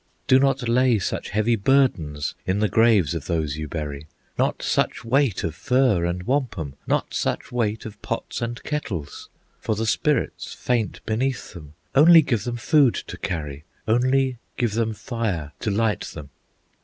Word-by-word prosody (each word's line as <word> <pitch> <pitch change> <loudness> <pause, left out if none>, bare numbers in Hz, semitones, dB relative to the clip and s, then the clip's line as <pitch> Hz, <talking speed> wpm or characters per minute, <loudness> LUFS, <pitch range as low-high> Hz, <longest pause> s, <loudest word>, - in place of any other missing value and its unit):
"Do 130 - +5
not 135 -2 +1
lay 125 0 +3
such 95 - -3
heavy 110 +3 +2
burdens 100 - +1
In 95 +2 +1
the 105 +1 +2
graves 110 -9 +3
of 80 -3 -5
those 80 -4 -1
you 80 0 -4
bury, 75 -2 -5 0.3
Not - - 0
such - - 0
weight 130 -3 +2
of 80 - -2
furs 105 - +2
and 90 +1 -3
wampum, 120 - -1
Not - - 0
such - - -2
weight 115 -3 -1
of 105 -2 -9
pots - - -4
and 120 +1 -4
kettles, 105 - -5 0.3
For 110 - -1
the 110 +2 -2
spirits 140 +4 0
faint 120 -4 -2
beneath 125 +4 -2
them. 75 -3 -12 0.2
Only 165 +3 +8
give 115 -7 -1
them 120 -1 -3
food 135 +1 +4
to - - -6
carry, 75 -4 -4 0.2
Only 130 +2 +2 0.2
give 120 -4 0
them 110 -1 0
fire 105 - -3
to - - -2
light 105 +1 +1
them. 75 -3 -8
110 Hz, 165 wpm, -23 LUFS, 85-125 Hz, 0.3 s, Only